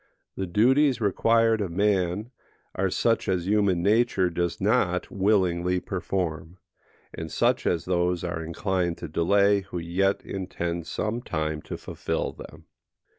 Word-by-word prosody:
The 95 - -3
duties 130 +9 +3
required 115 +1 +2
of 100 - -2
man 100 +3 0 0.4
are 95 0 0
such 115 +3 +1
as 90 -2 0
human 100 -4 +2
nature 100 -3 +2
does 85 0 -2
not 90 0 +1
willingly 90 -3 +1
perform, 90 -3 -3 0.6
and - - -6
such - - +1
as 85 -2 0
those 90 -1 0
are 85 -2 -3
inclined 85 +1 -1
to 85 - -6
delay 100 +6 +3
who 95 -2 -7
yet 90 +4 0
intend 85 -3 -4
some 110 +3 -2
time 80 -7 -3
to - - -7
fulfil - - -3
them. - - -12
95 Hz, 135 wpm, -26 LUFS, 85-105 Hz, 0.6 s, duties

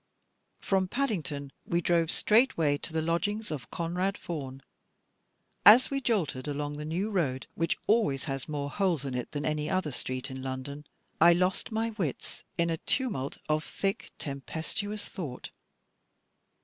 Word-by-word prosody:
From 190 -1 +1
Paddington 160 - -2
we 170 - +1
drove 170 -1 +2
straightway 165 - +3
to - - -5
the 160 0 0
lodgings 205 +6 0
of 135 -7 -5
Conrad 180 +4 -1
Vaughan. 135 -5 -6 1.0
As 230 +8 +9
we 275 0 0
jolted 170 - 0
along 145 0 -2
the 150 - -5
New 180 +7 -1
road, 140 -10 0
which 165 0 0
always 210 - +3
has 135 -2 -4
more 145 -1 -2
holes 180 -8 +1
in 135 - -3
it 125 -1 -3
than 145 0 -3
any 150 0 0
other 185 -5 0
street 130 +1 -4
in 130 0 -6
London, 135 +3 -5 0.3
I 170 +1 +9
lost 180 +5 +1
my 225 +1 0
wits 185 - -4
in 170 0 +2
a 165 - 0
tumult 200 - -1
of 155 0 +1
thick 195 -3 -2
tempestuous 165 +9 -4
thought. 150 -11 -6
165 Hz, 150 wpm, -30 LUFS, 140-195 Hz, 1.0 s, As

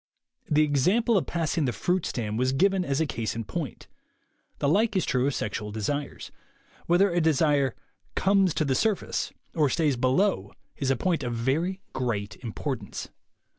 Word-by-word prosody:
The 150 0 +4
example 185 - +2
of 190 - +1
passing 165 -2 0
the 125 - +1
fruit 180 +8 0
stand 110 -2 -3
was 130 +1 +2
given 190 +5 +3
as 140 -4 -1
a 160 - +2
case 115 -7 -3
in 115 - -3
point. 155 +3 -5 0.7
The - - 0
like 210 +7 +2
is 190 - +2
true 125 +1 +1
of 145 - -1
sexual 105 0 -3
desires. 140 +7 -3 0.6
Whether 180 +3 +4
a 175 - +2
desire 145 -4 +2 0.4
"comes 195 -3 +3
to 155 - +1
the 135 - +1
surface" 210 +8 0 0.2
or 150 -4 +2
stays 150 -3 +1
below 130 - +1 0.2
is 135 - -2
a 135 - +3
point 175 +5 0
of 120 -1 -2
very 160 +11 0
great 110 -5 -2
importance. 115 -4 -5
145 Hz, 170 wpm, -27 LUFS, 125-180 Hz, 0.7 s, The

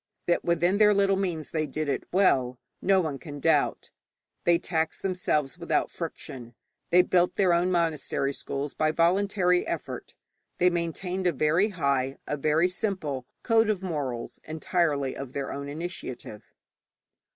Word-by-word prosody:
That 175 - +1
within 175 +3 +2
their 210 -1 +6
little 195 -1 +3
means 175 -5 -3
they 155 -1 -1
did 155 +2 -3
it 140 - -1
well, 130 -10 +3 0.2
no 195 0 +4
one 150 -5 -3
can 145 -3 -8
doubt. 150 0 +1 0.5
They 170 -1 +5
taxed 160 -2 -2
themselves 180 -7 -1
without - - 0
friction, 120 -3 -7 0.3
they 180 +1 +6
built 180 -1 +2
their 185 -3 +3
own 175 +2 +2
monastery 160 -5 0
schools 140 +1 -4
by 155 0 +1
voluntary 180 +2 +2
effort, - - -5 0.4
they 180 0 +4
maintained 180 +2 -2
a - - +4
very 160 +7 +2
high, 140 -7 0
a - - -2
very 155 +4 +2
simple, 180 - -2 0.2
code 225 -2 +3
of 195 -3 0
morals, 140 -9 -4
entirely 155 -3 0
of 135 -2 -7
their 140 -1 -3
own 140 0 -5
initiative. 145 - -7
165 Hz, 150 wpm, -27 LUFS, 140-180 Hz, 0.5 s, their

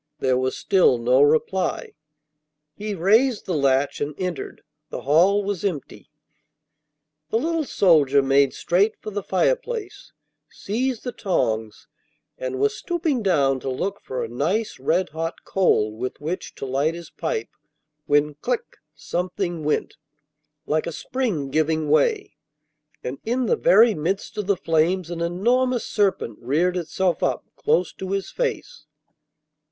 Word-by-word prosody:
There 130 -1 +1
was 130 0 -1
still 185 - +3
no 125 +3 +3
reply. 155 +6 +1 0.8
He 210 +2 -5
raised 215 +7 +3
the 185 - -2
latch 140 -2 +1
and 145 0 -2
entered; 180 -4 -5 0.3
the - - -5
hall 180 +8 +4
was 200 -3 -3
empty. 175 -9 -4 1.2
The 225 - +1
little 325 +4 0
soldier 145 - +4
made 135 0 +4
straight 200 +5 +1
for 215 - -7
the 205 0 -3
fireplace, 455 - -1 0.4
seized 245 +3 -3
the 245 - -3
tongs, 110 - -2 0.5
and 130 0 -4
was 140 +1 +2
stooping 330 -7 -1
down 140 -9 +2
to 135 - -4
look 195 +10 -3
for 130 - -4
a - - -3
nice 170 - -1
red 170 +7 +1
hot 165 +2 -5
coal 110 - +1
with 125 +3 -5
which 160 +5 -5
to - - -6
light 140 +5 0
his 170 -2 -10
pipe, 450 -3 -3 0.6
when 145 +1 +3
clic! 240 - -3 0.2
something 175 +2 -3
went, 150 - -1 0.7
like 155 +2 0
a - - -2
spring 185 - -2
giving 155 0 +1
way, 415 - +2 0.7
and 130 +2 -5
in 245 +3 0
the - - +2
very 240 - +5
midst 180 +5 -3
of 205 - -3
the 200 -2 +2
flames 165 +1 +1
an 170 -1 -4
enormous 240 +9 +1
serpent 190 - 0
reared 160 +9 +1
itself 180 +1 -1
up - - 0
close 465 +2 +1
to 190 0 -5
his 195 -1 -2
face. 480 -1 -4
175 Hz, 145 wpm, -23 LUFS, 145-210 Hz, 1.2 s, very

